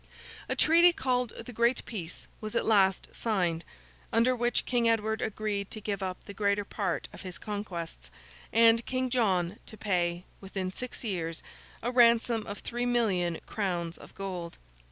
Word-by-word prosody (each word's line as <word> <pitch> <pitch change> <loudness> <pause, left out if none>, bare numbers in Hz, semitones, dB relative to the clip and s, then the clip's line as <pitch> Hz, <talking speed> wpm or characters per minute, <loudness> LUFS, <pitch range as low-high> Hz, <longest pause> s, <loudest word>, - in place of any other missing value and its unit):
A - - +1
treaty 340 +2 +6
called 250 -6 0
the 245 - -8
Great 235 +2 +2
Peace, 180 -7 -6 0.2
was 215 -1 -5
at - - +1
last 195 -4 +3
signed, 180 -7 0 0.5
under 240 +3 +4
which 240 0 +1
King 240 -2 +2
Edward 220 0 +1
agreed 210 -2 -2
to 215 - -5
give 205 -1 -3
up 185 -1 -4
the 200 - -9
greater 200 0 +1
part 200 0 -2
of - - -10
his 185 -4 -6
conquests, 175 - -5 0.4
and 230 0 +6
King 255 -1 -1
John 195 -6 +1
to 220 - -7
pay, 175 -4 0 0.2
within 190 -1 -4
six 250 +6 -5
years, 170 -7 -3 0.4
a 245 - 0
ransom 235 -2 +4
of 205 - -6
three 240 +1 -2
million 190 -9 +1
crowns 175 -5 -2
of - - -14
gold. 180 -4 -5
210 Hz, 160 wpm, -30 LUFS, 185-235 Hz, 0.5 s, treaty